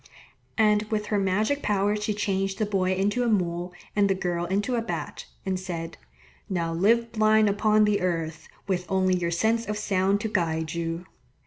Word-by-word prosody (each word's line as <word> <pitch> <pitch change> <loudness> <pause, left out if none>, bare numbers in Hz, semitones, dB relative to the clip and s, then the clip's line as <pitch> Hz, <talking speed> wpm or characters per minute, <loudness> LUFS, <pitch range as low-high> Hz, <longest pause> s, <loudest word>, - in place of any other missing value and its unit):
And 210 -2 +4
with 210 -1 -1
her 205 - +3
magic 210 +9 +1
power 205 0 +1
she 210 0 -2
changed 195 -1 -1
the 215 - +1
boy 190 -2 0
into 205 +5 0
a 245 - +1
mole 175 -4 0 0.2
and 205 -1 +3
the 195 - +2
girl 175 -2 -2
into 200 +7 -1
a 235 - +1
bat, 225 - -5 0.2
and 190 -1 -1
said, 170 -3 -5 0.5
"Now 170 -3 -1
live 230 +7 +2
blind 215 -1 +4
upon 210 +1 +3
the 210 -2 +1
earth, 165 -3 -2 0.2
with 180 -2 -1
only 185 -1 +3
your 175 -1 -1
sense 220 +7 +1
of 210 0 -2
sound 195 -1 +1
to 220 - -1
guide 160 -5 -1
you." 170 +1 -3
195 Hz, 185 wpm, -26 LUFS, 180-210 Hz, 0.5 s, And